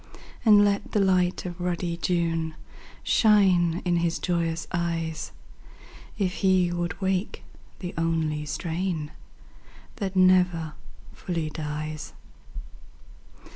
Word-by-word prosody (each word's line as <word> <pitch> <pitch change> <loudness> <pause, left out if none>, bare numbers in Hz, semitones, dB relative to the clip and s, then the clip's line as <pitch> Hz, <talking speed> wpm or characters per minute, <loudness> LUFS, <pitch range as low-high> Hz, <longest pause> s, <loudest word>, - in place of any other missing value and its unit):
And 210 -2 +7
let 200 0 -1
the 210 - +3
light 185 -2 +2
of 175 0 -6
ruddy 175 -1 -1
June 165 -2 -1 0.5
Shine 185 -6 +4
in 175 -1 +2
his 170 0 0
joyous 165 -2 -1
eyes. 165 -2 -2 0.9
If 190 -3 -1
he 185 -3 +3
would 175 +1 -3
wake 190 0 -1 0.4
the 180 -1 -5
only 160 -2 -1
strain 160 0 -3 0.9
That 195 -3 -3
never 180 -4 +3 0.4
fully 165 -4 -3
dies 155 -1 -5
175 Hz, 100 wpm, -26 LUFS, 165-185 Hz, 0.9 s, And